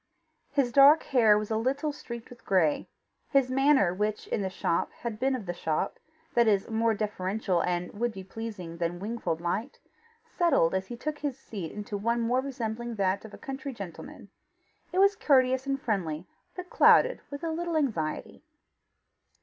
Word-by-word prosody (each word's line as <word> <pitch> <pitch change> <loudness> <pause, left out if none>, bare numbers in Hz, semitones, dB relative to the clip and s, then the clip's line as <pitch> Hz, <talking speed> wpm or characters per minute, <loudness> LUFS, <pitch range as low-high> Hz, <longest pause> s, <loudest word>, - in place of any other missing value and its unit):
His 275 -4 +1
dark 280 +4 +7
hair 225 -6 +4
was 210 +1 -3
a 220 - +1
little 275 +6 0
streaked 235 -4 -9
with 245 - -14
gray. 170 -6 +2 0.4
His 270 -3 +3
manner, 270 -8 +4
which, 210 +2 -2
in - - -2
the 190 - -1
shop, 170 -2 -1
had 230 -3 -6
been 265 +1 +1
of 235 -6 -6
the 175 - -3
shop, 160 -3 -2 0.3
that 235 -1 +4
is, 200 -2 +2
more 225 0 +2
deferential 200 -3 -1
and 180 0 -2
would 240 +3 -1
be 190 -3 -8
pleasing 190 -5 -7
than 170 +1 -2
Wingfold 195 -4 -3
liked, 200 +10 -3 0.5
settled 335 - +2
as 190 0 -1
he 240 - -7
took 295 +3 -4
his 285 -3 -3
seat 200 -10 -7
into 205 0 -5
one 230 +4 0
more 245 +3 +1
resembling 240 -3 -4
that 195 0 0
of 215 - -11
a - - -13
country 270 0 -6
gentleman. 190 -6 -9 0.6
It 360 - -4
was 395 +1 +5
courteous 260 -4 +3
and 275 0 0
friendly, 180 - -2 0.3
but 360 0 -8
clouded - - +5
with 285 +3 -7
a 330 - -1
little 335 0 -1
anxiety. 190 - -2
225 Hz, 175 wpm, -28 LUFS, 190-270 Hz, 0.6 s, dark